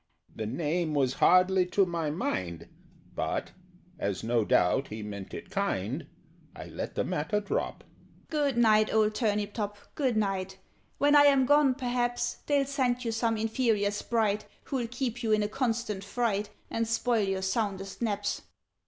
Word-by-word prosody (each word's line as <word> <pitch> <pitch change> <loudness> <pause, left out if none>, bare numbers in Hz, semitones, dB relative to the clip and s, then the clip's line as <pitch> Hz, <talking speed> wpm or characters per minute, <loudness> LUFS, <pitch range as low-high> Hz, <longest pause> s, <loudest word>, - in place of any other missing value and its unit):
The 110 - -3
name 155 +5 -1
was 130 -3 +2
hardly 185 0 +5
to 195 +2 +3
my 170 -3 -2
mind, 90 - -3 0.5
But, - - -2 0.5
as 100 -6 -2
no 115 0 +2
doubt 105 +7 +2
he 110 0 -6
meant 100 -2 -7
it 185 - -8
kind, 145 - -2 0.5
I - - -8
let - - -6
the - - +1
matter 185 +8 -1
drop. 425 - -3 0.4
"Good 290 -5 0
night, 215 -2 +4
old 215 -1 +3
Turnip 210 -2 0
top, 205 -2 -3 0.2
good 260 -6 0
night! 190 -2 -1 0.4
When 290 +1 +4
I 290 0 +8
am 275 -2 +5
gone, 290 -1 +4
perhaps 245 -2 -1
They'll 285 -2 +3
send 255 -3 0
you 230 - 0
some 225 0 0
inferior 220 -2 +1
Sprite, 210 0 0 0.2
Who'll 255 -4 -2
keep 245 0 -3
you 220 -2 +1
in 215 0 +3
a - - 0
constant 225 -4 -2
fright 210 -1 -1 0.2
And 230 0 0
spoil 230 0 +1
your 190 0 -1
soundest 195 -1 -2
naps. 205 -3 -1
210 Hz, 160 wpm, -29 LUFS, 185-240 Hz, 0.5 s, I